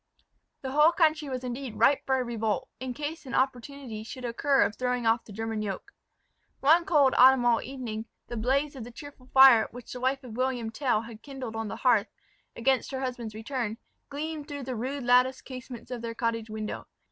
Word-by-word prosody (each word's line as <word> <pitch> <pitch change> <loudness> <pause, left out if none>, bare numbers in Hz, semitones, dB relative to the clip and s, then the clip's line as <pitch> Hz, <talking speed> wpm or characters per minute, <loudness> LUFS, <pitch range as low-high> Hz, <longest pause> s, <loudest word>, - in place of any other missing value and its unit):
The 265 - -3
whole 300 +4 +6
country 310 -4 +2
was 255 -1 -4
indeed 250 -1 -5
ripe 280 - +3
for 265 0 +3
a - - 0
revolt, 220 -5 -2
in 255 0 -5
case 300 0 -5
an - - -4
opportunity 260 -2 -2
should 250 +2 -8
occur 270 +4 +2
of 215 - -1
throwing 250 -1 -1
off 225 +1 +2
the - - -12
German 225 +1 -3
yoke. 210 - -5 0.7
One 325 +5 +5
cold 285 -5 +4
autumnal 245 -2 +6
evening, 235 -4 -6 0.2
the 240 - -7
blaze 275 +6 0
of 255 - -6
the 235 - -9
cheerful 270 0 -12
fire 265 -4 +7
which 245 0 -10
the 250 - -6
wife 265 +2 0
of 235 -4 -9
William 250 -3 -1
Tell 240 -2 +1
had 230 -1 -11
kindled 265 -5 -7
on 225 0 -3
the - - -5
hearth, 230 -5 +3 0.5
against 260 +2 +1
her 265 -1 -4
husband's 245 -4 -4
return, 225 -1 -3 0.3
gleamed 300 +1 -5
through 285 -2 -6
the 255 0 -4
rude 260 +4 -3
latticed 250 +2 +3
casements 255 -2 -9
of 245 -2 -4
their 230 0 -5
cottage 230 -1 -2
window. 215 0 -5
255 Hz, 195 wpm, -28 LUFS, 230-270 Hz, 0.7 s, fire